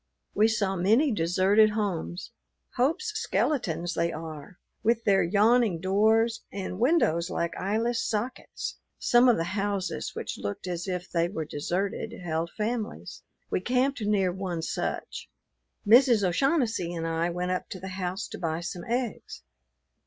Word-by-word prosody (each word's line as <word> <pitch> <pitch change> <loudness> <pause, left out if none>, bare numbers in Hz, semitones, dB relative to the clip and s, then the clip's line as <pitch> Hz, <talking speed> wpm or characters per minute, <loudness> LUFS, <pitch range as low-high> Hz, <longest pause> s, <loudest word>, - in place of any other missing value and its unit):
We 215 +2 +4
saw 205 -3 0
many 220 - +3
deserted 195 +3 +4
homes. 200 -4 -3 0.4
Hope's 305 - +1
skeletons 190 - -1
they 170 0 0
are, 155 +2 -8 0.2
with 230 0 +2
their 195 -2 +4
yawning 210 +1 +3
doors 220 +5 +2
and 190 -1 -5
windows 205 - +2
like 170 0 -2
eyeless 225 +4 0
sockets. 230 +4 -4 0.2
Some 245 +1 +5
of 235 - +4
the 165 - 0
houses, 195 +1 -2
which - - -5
looked 100 - -4
as 175 0 -4
if 180 -1 -3
they 170 0 +1
were 160 -5 -4
deserted, 190 +9 -3
held 165 -1 -2
families. 215 - -3 0.3
We - - +1
camped 255 +4 +1
near 205 -3 +2
one 180 -3 -4
such. - - -4 0.6
Mrs. 235 0 +6
O'Shaughnessy 230 - +1
and 165 -1 -3
I 165 +1 0
went 180 +1 -2
up 185 - -3
to 185 - -7
the 190 +2 -6
house 185 +2 -3
to - - -8
buy 165 -1 -2
some 175 0 -5
eggs. 235 - -3
195 Hz, 145 wpm, -27 LUFS, 175-225 Hz, 0.6 s, Mrs